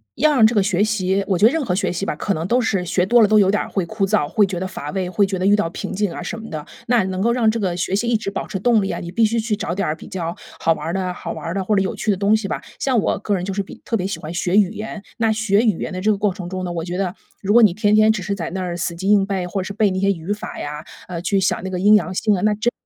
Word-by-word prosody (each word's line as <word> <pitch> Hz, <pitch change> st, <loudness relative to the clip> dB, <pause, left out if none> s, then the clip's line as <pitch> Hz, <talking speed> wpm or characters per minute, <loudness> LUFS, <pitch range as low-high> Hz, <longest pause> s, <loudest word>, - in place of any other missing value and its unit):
要 305 Hz, +5 st, +3 dB
让 230 Hz, -6 st, +6 dB
这 230 Hz, -, -2 dB
个 205 Hz, -, +4 dB
学 190 Hz, -1 st, +1 dB
习 200 Hz, -2 st, +1 dB
我 190 Hz, -3 st, +1 dB
觉 205 Hz, -, +4 dB
得 230 Hz, -, +6 dB
任 320 Hz, -2 st, -1 dB
何 180 Hz, -, 0 dB
学 195 Hz, -, 0 dB
习 180 Hz, +3 st, -3 dB
吧， -, -, -2 dB
可 200 Hz, -, -1 dB
能 165 Hz, -1 st, -3 dB
都 245 Hz, +5 st, +2 dB
是 195 Hz, -6 st, 0 dB
学 180 Hz, +1 st, +1 dB
多 240 Hz, +3 st, +5 dB
了， 215 Hz, -, +6 dB
都 215 Hz, +1 st, +4 dB
有 195 Hz, -2 st, +5 dB
点 210 Hz, -, +1 dB
儿 -, -, -5 dB
会 190 Hz, -3 st, -1 dB
枯 195 Hz, +2 st, -1 dB
燥， 205 Hz, -5 st, +2 dB
会 205 Hz, +7 st, +3 dB
觉 190 Hz, -2 st, -4 dB
得 185 Hz, -, -3 dB
乏 165 Hz, -6 st, -6 dB
味， 185 Hz, 0 st, -2 dB
会 200 Hz, +2 st, +2 dB
觉 190 Hz, -1 st, -3 dB
得 185 Hz, -, -1 dB
遇 200 Hz, -, +5 dB
到 205 Hz, -5 st, +2 dB
瓶 200 Hz, -, -5 dB
颈 205 Hz, +1 st, 0 dB
啊 -, -, -6 dB
什 225 Hz, -, -5 dB
么 225 Hz, -, -9 dB
的。 155 Hz, -2 st, -6 dB, 0.2 s
那 240 Hz, -4 st, +3 dB
能 185 Hz, 0 st, -3 dB
够 235 Hz, +2 st, +2 dB
让 230 Hz, -3 st, +3 dB
这 230 Hz, -, -3 dB
个 185 Hz, -4 st, -1 dB
学 180 Hz, +1 st, -2 dB
习 210 Hz, +5 st, 0 dB
一 235 Hz, -, +2 dB
直 215 Hz, -2 st, -2 dB
保 -, -, -4 dB
持 205 Hz, -, -4 dB
动 225 Hz, +2 st, +3 dB
力 195 Hz, -, -2 dB
啊， -, -, -3 dB
你 170 Hz, -, -6 dB
必 230 Hz, +4 st, +3 dB
须 225 Hz, +2 st, 0 dB
去 225 Hz, -1 st, -1 dB
找 175 Hz, -, -3 dB
点 200 Hz, -, -1 dB
儿 155 Hz, -, 0 dB
比 -, -, -12 dB
较 175 Hz, -4 st, -4 dB, 0.3 s
好 165 Hz, -, +3 dB
玩 160 Hz, -, -2 dB
儿 165 Hz, -, -2 dB
的 185 Hz, -1 st, -2 dB
好 -, -, -6 dB
玩 165 Hz, -, -7 dB
儿 165 Hz, -, -2 dB
的， 195 Hz, -, -1 dB
或 210 Hz, -, +2 dB
者 195 Hz, -, +3 dB
有 190 Hz, -, -2 dB
趣 -, -, -4 dB
的 200 Hz, -, +4 dB
东 200 Hz, +3 st, +2 dB
西 215 Hz, -2 st, -4 dB
吧。 -, -, -3 dB, 0.2 s
像 260 Hz, -3 st, +1 dB
我 -, -, 0 dB
个 205 Hz, 0 st, -1 dB
人 180 Hz, -, -3 dB
就 195 Hz, +1 st, -3 dB
是 200 Hz, -, -1 dB
比 195 Hz, -, -11 dB
特 225 Hz, -, -1 dB
别 185 Hz, -, -2 dB
喜 200 Hz, -, -4 dB
欢 155 Hz, +3 st, -7 dB
学 180 Hz, +1 st, 0 dB
语 205 Hz, -3 st, +5 dB
言， 215 Hz, -1 st, -7 dB
那 225 Hz, -1 st, +2 dB
学 215 Hz, -2 st, +2 dB
语 215 Hz, -7 st, +2 dB
言 -, -, -4 dB
的 185 Hz, -, -4 dB
这 205 Hz, +4 st, +1 dB
个 210 Hz, -, +3 dB
过 200 Hz, -1 st, +1 dB
程 180 Hz, -2 st, -7 dB
中 185 Hz, 0 st, -4 dB
呢， 180 Hz, -, -3 dB
我 165 Hz, -1 st, -3 dB
觉 175 Hz, +1 st, -4 dB
得， 185 Hz, -2 st, -1 dB, 0.3 s
如 200 Hz, -, -1 dB
果 240 Hz, +3 st, +7 dB
你 210 Hz, -6 st, +6 dB
天 205 Hz, +2 st, +1 dB
天 215 Hz, 0 st, +5 dB
只 210 Hz, -, -4 dB
是 200 Hz, -, -2 dB
在 175 Hz, -5 st, -4 dB
那 190 Hz, +1 st, -3 dB
儿 175 Hz, -1 st, -3 dB
死 170 Hz, 0 st, -2 dB
记 190 Hz, +3 st, -2 dB
硬 205 Hz, -2 st, +5 dB
背， 195 Hz, -2 st, -2 dB
或 190 Hz, +2 st, -3 dB
是 195 Hz, +2 st, -5 dB
背 210 Hz, -1 st, +2 dB
那 185 Hz, -, -1 dB
些 195 Hz, +1 st, +2 dB
语 180 Hz, -1 st, -2 dB
法 210 Hz, -, -5 dB
呀， 150 Hz, +1 st, -6 dB, 0.2 s
呃， 170 Hz, -2 st, -4 dB
去 195 Hz, +3 st, 0 dB
想 190 Hz, -, +1 dB
那 190 Hz, -, -3 dB
个 185 Hz, -, -3 dB
阴 210 Hz, +2 st, +7 dB
阳 185 Hz, -3 st, +1 dB
性 210 Hz, +3 st, +1 dB
啊， 180 Hz, -, -3 dB
那 215 Hz, -, +3 dB
真 215 Hz, +3 st, 0 dB
195 Hz, 380 characters per minute, -20 LUFS, 180-215 Hz, 0.3 s, 果